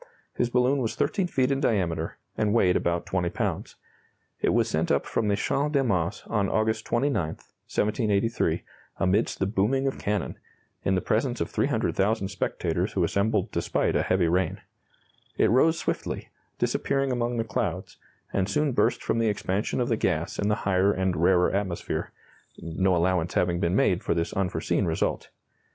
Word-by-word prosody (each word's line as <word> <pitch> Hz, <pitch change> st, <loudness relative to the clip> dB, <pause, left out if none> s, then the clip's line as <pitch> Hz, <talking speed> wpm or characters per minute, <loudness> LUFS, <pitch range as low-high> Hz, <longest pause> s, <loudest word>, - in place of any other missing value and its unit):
His 120 Hz, -, 0 dB
balloon 125 Hz, +3 st, +2 dB
was 115 Hz, -, -2 dB
13 195 Hz, -4 st, 0 dB
feet 130 Hz, -5 st, +1 dB
in 135 Hz, -, +1 dB
diameter, 85 Hz, -7 st, 0 dB, 0.2 s
and 105 Hz, 0 st, +1 dB
weighed 90 Hz, -6 st, +4 dB
about 85 Hz, 0 st, 0 dB
20 90 Hz, -2 st, -1 dB
pounds. -, -, -3 dB, 0.7 s
It -, -, +2 dB
was -, -, +2 dB
sent -, -, -1 dB
up -, -, +2 dB
from 110 Hz, -, -1 dB
the 100 Hz, -, +2 dB
Champ 145 Hz, +8 st, 0 dB
de 140 Hz, -2 st, +3 dB
Mars 90 Hz, -6 st, -1 dB
on 100 Hz, -4 st, 0 dB
August 110 Hz, 0 st, 0 dB
29, 140 Hz, +4 st, +1 dB
1783, 105 Hz, +6 st, -1 dB, 0.3 s
amidst 95 Hz, +4 st, +1 dB
the 95 Hz, -, 0 dB
booming 110 Hz, +7 st, +1 dB
of 135 Hz, -, -1 dB
cannon, 105 Hz, -3 st, -2 dB, 0.4 s
in 95 Hz, -, +2 dB
the 90 Hz, -, +1 dB
presence -, -, 0 dB
of -, -, -2 dB
300,000 100 Hz, 0 st, 0 dB
spectators 95 Hz, -, -2 dB
who -, -, +1 dB
assembled 100 Hz, -1 st, +1 dB
despite -, -, 0 dB
a -, -, +3 dB
heavy 90 Hz, -2 st, +2 dB
rain. 90 Hz, +3 st, 0 dB, 0.8 s
It -, -, +3 dB
rose 160 Hz, +7 st, +4 dB
swiftly, -, -, -3 dB, 0.3 s
disappearing 135 Hz, -1 st, 0 dB
among 120 Hz, -1 st, -1 dB
the 115 Hz, -, +1 dB
clouds, 110 Hz, -, -3 dB, 0.4 s
and 95 Hz, 0 st, 0 dB
soon 150 Hz, -1 st, +1 dB
burst -, -, +1 dB
from 115 Hz, -, 0 dB
the 115 Hz, -1 st, +2 dB
expansion 100 Hz, +2 st, -1 dB
of 120 Hz, -, +1 dB
the 115 Hz, -, +1 dB
gas 85 Hz, -5 st, -1 dB
in 100 Hz, -, +1 dB
the 105 Hz, -, +2 dB
higher 95 Hz, 0 st, +3 dB
and 95 Hz, -2 st, 0 dB
rarer 90 Hz, +2 st, +3 dB
atmosphere 95 Hz, -3 st, -2 dB, 0.5 s
no 90 Hz, +3 st, 0 dB
allowance 85 Hz, 0 st, +1 dB
having 85 Hz, -1 st, +1 dB
been 90 Hz, -1 st, +1 dB
made -, -, +2 dB
for -, -, 0 dB
this 85 Hz, 0 st, -1 dB
unforeseen 95 Hz, -2 st, 0 dB
result. -, -, -1 dB
100 Hz, 170 wpm, -26 LUFS, 90-120 Hz, 0.8 s, weighed